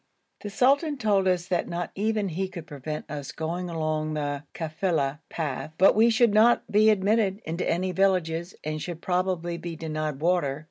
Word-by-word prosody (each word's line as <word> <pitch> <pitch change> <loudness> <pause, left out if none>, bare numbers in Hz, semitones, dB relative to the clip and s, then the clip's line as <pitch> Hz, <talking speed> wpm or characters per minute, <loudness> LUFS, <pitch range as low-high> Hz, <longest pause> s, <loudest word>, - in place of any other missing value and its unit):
The 205 - -6
sultan 280 +7 +2
told 200 -5 +2
us 180 -2 +1
that 180 -2 0
not 175 0 -4
even 210 0 0
he 185 +3 -2
could 175 -4 -8
prevent 150 0 -6
us 145 -2 -6
going 175 +3 -4
along 155 -1 -2
the 145 -1 -3
kafila 155 -3 -1
path, 155 -1 -4
but 190 - +6
we 225 +2 +5
should 230 -1 +3
not 225 +3 +5
be 215 +1 +5
admitted 205 -1 +2
into 165 +3 -2
any 185 +2 0
villages 180 -2 0
and 155 0 -3
should 170 0 -6
probably 180 -2 -1
be 170 -1 -6
denied 155 -3 -3
water. 155 -4 +1
175 Hz, 175 wpm, -26 LUFS, 155-195 Hz, -, but